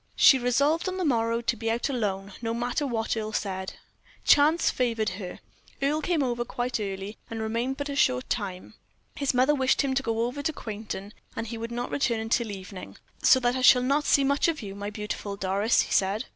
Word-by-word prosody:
She 265 - +7
resolved 280 +8 +2
on 370 - -4
the 370 - -1
morrow 230 -4 +1
to 235 +1 0
be 225 0 -3
out 230 +1 0
alone, 200 -7 -2
no 230 -1 -2
matter 245 +5 -1
what 225 -3 -1
Earle 215 -1 -4
said. 190 -2 -3 0.5
Chance 305 +3 +5
favored 230 -4 0
her. 185 -1 -7 0.4
Earle 290 +3 +1
came 330 -3 +1
over 240 -2 -1
quite 245 0 -3
early, 195 0 -5
and 225 - -5
remained 230 +4 -2
but 285 - -3
a 280 - -4
short 125 - +2
time. 190 -5 -4 0.4
His 280 -2 0
mother 260 +4 +4
wished 265 -1 +2
him 270 -1 0
to 270 - +1
go 230 -2 0
over 250 +4 -4
to 315 +2 -1
Quainton, 210 -4 -6 0.2
and 225 - -3
he 230 +1 -6
would 230 +1 -5
not 240 +1 -4
return 230 -5 0
till 235 -1 +1
evening. 190 -1 -8 0.2
"So 260 - +6
that 245 0 +1
I 260 - -1
shall 250 0 +7
not 280 +3 +1
see 280 - +4
much 280 +3 +2
of 315 -7 -1
you, 195 -1 -6
my 200 +1 -5
beautiful 210 -1 -5
Doris," 200 +3 +2
he - - -5
said. 200 +6 +1
235 Hz, 215 wpm, -27 LUFS, 210-270 Hz, 0.5 s, She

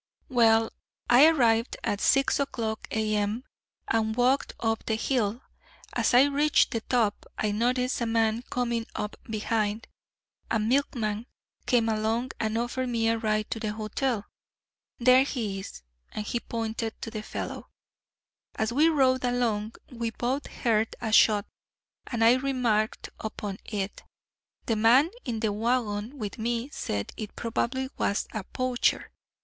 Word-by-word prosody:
"Well, 225 -2 +4 0.4
I 260 +6 +9
arrived 235 -7 +3
at 205 - -1
six 275 +1 +3
o'clock 225 -6 -2
A.M. 215 +1 0 0.4
and 220 -1 +1
walked 250 +3 +2
up 225 -1 0
the 220 - +1
hill. 230 0 -1 0.5
As - - +2
I 250 - +8
reached 285 +1 +3
the 230 -4 -1
top, 225 -4 0
I 215 - 0
noticed 250 +4 0
a 235 - 0
man 225 0 +1
coming 235 -3 -1
up 210 - -3
behind. 215 0 -1 0.6
A 225 - +2
milkman 225 -2 0 0.4
came 235 -2 +3
along 225 +3 0
and 220 0 0
offered 250 +2 -2
me 225 -1 +1
a 230 0 +1
ride 215 -1 -1
to 225 - -2
the 215 -1 -2
hotel 215 +1 -2 0.7
there 255 +1 +6
he 225 -8 -2
is," 125 - -9 0.3
and 210 - -4
he 240 - -1
pointed 225 -1 -4
to 225 - -5
the 215 -2 -4
fellow. - - -6 0.9
"As 220 +1 -1
we 305 +5 +5
rode 260 -4 +3
along, 230 -3 0 0.2
we 235 -2 -2
both 250 +5 -2
heard 220 -2 0
a 220 - -3
shot, 210 -1 +5 0.6
and 230 -2 -1
I 235 +3 +6
remarked 245 -5 0
upon 205 -2 -5
it. 205 -2 -4 0.6
The 225 - +1
man 245 +9 +5
in 230 -4 -3
the 215 -3 +1
wagon 225 +2 -1
with 215 -2 -5
me 235 +4 -2
said 100 - -3
it 215 -2 -6
probably 255 +3 -2
was 200 - +1
a 215 - -3
poacher. 255 +1 0
230 Hz, 145 wpm, -27 LUFS, 215-250 Hz, 0.9 s, I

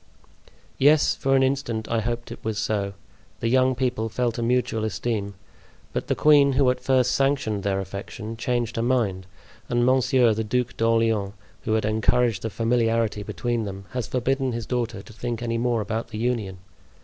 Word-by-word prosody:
"Yes, 145 +2 +5
for 135 0 +1
an 135 - +4
instant 130 -5 -1
I 115 - 0
hoped 120 +2 -3
it - - -9
was 110 -1 -2
so. 100 -2 -1 0.5
The 115 - 0
young 130 +1 +3
people 125 -3 -1
felt 120 +1 -1
a - - -1
mutual 115 -2 0
esteem; 105 -1 -2 0.6
but - - -3
the - - +1
queen, 145 -2 +5
who 130 -1 +4
at 125 - -4
first 130 -2 +2
sanctioned 135 -7 +1
their 95 -1 0
affection, 100 +3 -6
changed 120 -1 -2
her - - +1
mind, 110 -7 0 0.4
and 120 0 +2
Monsieur, 130 -2 +4
the 110 +1 -2
Duc 125 +3 -1
d'Orleans, 115 -3 +1 0.3
who 110 - 0
had 110 -1 +1
encouraged 110 +2 +2
the 110 - -3
familiarity 115 -1 +1
between 120 +2 -2
them, 100 0 -7
has 125 -4 -3
forbidden 130 +1 0
his 115 -1 -4
daughter 120 -5 -2
to 110 - -14
think 120 +1 -4
any 115 -1 -1
more 120 -2 +1
about 110 +3 -3
the 110 -2 -7
union. 110 -5 -1
115 Hz, 180 wpm, -24 LUFS, 110-125 Hz, 0.6 s, Yes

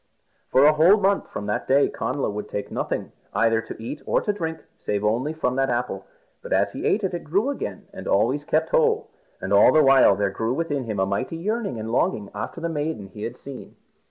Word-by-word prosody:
For 135 +2 +5
a 150 - +7
whole 165 +7 +6
month 200 -1 +1
from 100 - -6
that 105 - -2
day 140 +2 +4
Connla 130 +1 -2
would 105 0 -5
take 100 - -5
nothing, - - -3 0.2
either 115 0 +3
to - - -9
eat 120 +6 -6
or - - +3
to 210 - -1
drink, 160 -5 -5
save 105 0 -2
only 120 +8 +1
from 130 -5 -2
that 135 0 +1
apple. 120 0 -2 0.3
But - - -10
as - - +2
he - - -3
ate 210 - +1
it 180 -3 -2
grew 200 - 0
again - - -6
and - - -8
always - - +2
kept - - 0
whole. 465 -2 +2 0.3
And - - -2
all - - +7
the 155 - +5
while 135 -1 +6
there 100 -1 0
grew 115 +3 -2
within 145 -5 -2
him 110 -3 -3
a 95 - +3
mighty 100 +11 -2
yearning 205 - -2
and 110 +1 -5
longing 105 -3 0
after 105 +10 -5
the 170 - -2
maiden 150 -10 -3
he 105 +2 -11
had 120 +3 -5
seen. 135 -2 -10
135 Hz, 220 wpm, -24 LUFS, 115-170 Hz, 0.3 s, a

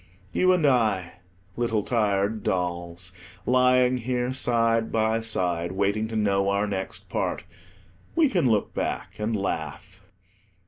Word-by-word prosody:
You 185 0 +3
and 180 -4 +2
I, 110 -10 +1 0.4
little 115 -3 0
tired 105 -2 0
dolls, 90 0 -2 0.3
lying 125 0 +4
here 125 +1 -1
side 115 -3 +1
by 110 0 +1
side, 90 -6 -1
waiting 100 +3 0
to 110 - -6
know 100 -2 +2
our 100 +1 +1
next 95 -2 -4
part, - - -2 0.7
we 330 -2 +5
can 175 - +1
look 105 -3 +1
back - - -4
and 110 +1 -1
laugh. 95 0 -4
110 Hz, 130 wpm, -25 LUFS, 95-120 Hz, 0.7 s, we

